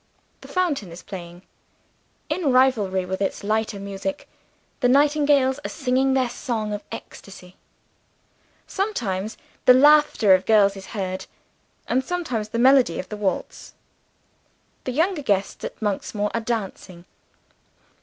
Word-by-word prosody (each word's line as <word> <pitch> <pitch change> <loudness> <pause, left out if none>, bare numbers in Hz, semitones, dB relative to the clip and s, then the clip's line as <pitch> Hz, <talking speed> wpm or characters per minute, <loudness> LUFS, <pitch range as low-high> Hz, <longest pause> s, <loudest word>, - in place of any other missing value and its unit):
The - - -12
fountain 300 - -1
is 170 - -10
playing. 175 -2 -9 0.8
In 330 -7 0
rivalry 220 -8 +2
with 190 +1 -4
its 195 - -2
lighter 215 0 -1
music, 200 +9 -5 0.5
the 245 - +2
nightingales 285 -1 +3
are - - -4
singing 265 -1 +1
their 260 -2 +2
song 230 -4 -3
of 205 - -4
ecstasy. 185 -2 -11 1.1
Sometimes, 220 - -3 0.3
the 250 - +8
laughter 295 -7 +5
of 185 0 +2
girls 205 -2 +4
is 195 -1 -10
heard 185 -1 -4 0.6
and, 260 +2 +1
sometimes, 255 -10 -3
the 230 - -3
melody 255 -6 +4
of 185 - -6
a - - -2
waltz. 205 -2 -4 1.1
The 255 - -2
younger 325 +5 0
guests 200 -6 -1
at - - -6
Monksmoor 210 0 -2
are 230 - -1
dancing. 195 -6 -5
220 Hz, 130 wpm, -23 LUFS, 195-270 Hz, 1.1 s, the